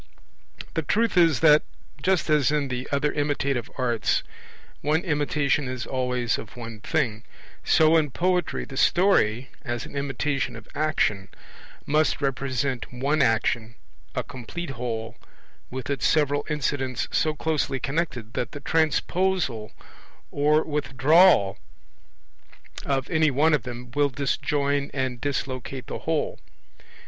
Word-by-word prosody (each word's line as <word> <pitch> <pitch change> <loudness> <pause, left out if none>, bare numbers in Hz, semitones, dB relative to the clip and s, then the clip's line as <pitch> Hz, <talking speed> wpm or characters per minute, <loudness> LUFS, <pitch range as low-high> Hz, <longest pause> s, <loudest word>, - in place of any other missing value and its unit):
The - - 0
truth 230 +2 +1
is 165 -6 +4
that, 150 -1 +7 0.4
just 190 +4 +1
as 150 -3 +3
in 145 -2 0
the 125 0 -4
other 145 +1 +1
imitative 140 -4 -1
arts 120 -4 +1 0.6
one 155 +3 +1
imitation 145 -4 0
is 125 -1 -4
always 125 -2 -1
of 115 - -10
one 115 -2 -7
thing, 110 +1 -1 0.4
so 160 0 +5
in 155 -2 +2
poetry 180 +4 0
the 135 - -9
story, 135 - +3
as 120 0 -4
an - - -11
imitation 140 0 -1
of - - -11
action, 105 -11 0 0.6
must 155 +2 +2
represent 135 -2 -2
one 140 +5 0
action, 115 -1 +1 0.4
a - - -1
complete 135 +6 -7
whole, 115 -3 -4 0.5
with 130 -1 -6
its 140 -3 0
several 145 -2 +1
incidents 135 -4 -1
so 155 -1 +1
closely 150 -4 -1
connected 130 -5 -3
that 120 -1 -3
the 145 - -6
transposal 160 - 0 0.6
or 150 +2 +3
withdrawal 145 - +4 1.3
of 135 -2 0
any 160 -2 +4
one 150 +4 +3
of 150 - +3
them 125 0 -8
will 145 0 +2
disjoin 140 +1 -1
and 130 -3 -2
dislocate 135 -2 -3
the - - -5
whole. - - -2
140 Hz, 130 wpm, -25 LUFS, 125-150 Hz, 1.3 s, that